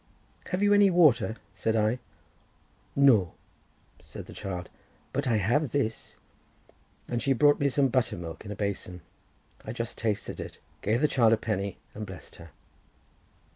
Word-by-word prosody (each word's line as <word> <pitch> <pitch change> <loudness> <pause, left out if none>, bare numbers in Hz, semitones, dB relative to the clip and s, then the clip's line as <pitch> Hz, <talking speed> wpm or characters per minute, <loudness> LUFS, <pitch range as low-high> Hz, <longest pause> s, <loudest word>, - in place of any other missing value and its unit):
"Have 185 +2 -1
you 205 0 +5
any 205 -1 +6
water?" 140 - +4 0.2
said 110 +4 -1
I. 110 +3 +2 1.0
"No," 115 -11 +5 0.7
said - - -10
the - - -11
child; 90 -3 -5 0.5
"but 140 +1 -1
I 115 - +3
have 120 +9 +1
this," 115 -6 -2 0.9
and 120 -1 -2
she 135 - +2
brought 145 +3 +4
me 140 - +2
some 135 0 +2
butter 125 -5 +1
milk 85 -2 -7
in 105 - -9
a - - -4
basin. 95 -3 -4 0.6
I 110 - -5
just 115 -1 -5
tasted 110 -3 -2
it, - - -7 0.2
gave 110 +5 +1
the 150 - +5
child 115 -6 +4
a - - +3
penny 100 -3 -2 0.2
and 105 0 -6
blessed 95 -4 -10
her. 85 0 -12
115 Hz, 160 wpm, -28 LUFS, 100-140 Hz, 1.0 s, any